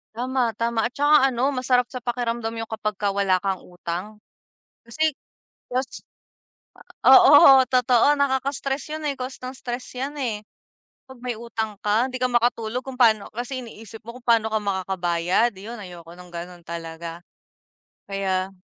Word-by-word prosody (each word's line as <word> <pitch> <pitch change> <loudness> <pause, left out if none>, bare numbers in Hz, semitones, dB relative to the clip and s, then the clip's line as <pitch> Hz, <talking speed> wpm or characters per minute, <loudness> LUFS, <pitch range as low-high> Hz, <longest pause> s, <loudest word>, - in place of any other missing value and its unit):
Tama, 250 -1 0
tama. 230 -1 -1
At 245 - -3
saka 290 -1 +4
ano 250 +3 +1
masarap 255 -2 +1
sa 255 - -6
pakiramdam 235 -2 -3
yung 225 -1 -6
kapagka 215 -2 -2
wala 195 -2 +1
kang 195 -2 -1
utang. 180 +4 -6 0.6
Kasi, 310 +7 0 0.6
cause 255 +1 -3 1.0
oo, 270 -5 +9
totoo, 250 +2 +4
nakaka-stress 275 +1 -1
yon, 310 -1 -6
eh, 280 - -1
cause 255 +1 -6
ng 255 +1 -6
stress 245 0 -5
yan, 285 +3 -4
eh. 225 -6 -3 0.7
'Pag 260 -1 -13
may 250 -1 -2
utang 220 -3 -4
ka 215 +5 +2
'di 255 - -5
ka - - +4
makatulog 240 0 0
kung 265 -1 -7
paano 220 -4 +3
kasi 250 +3 -4
iniisip 225 -1 -11
mo 235 +1 -8
kung 250 - -24
pano 225 -2 +3
ka 220 - +2
makakabayad, 185 +2 0
'yon 225 +4 -8
ayoko 175 -3 -11
ng 180 0 -13
gano'n 175 +1 -8
talaga. 165 0 -7 0.9
Kaya 190 -1 -1
230 Hz, 150 wpm, -23 LUFS, 195-255 Hz, 1.0 s, oo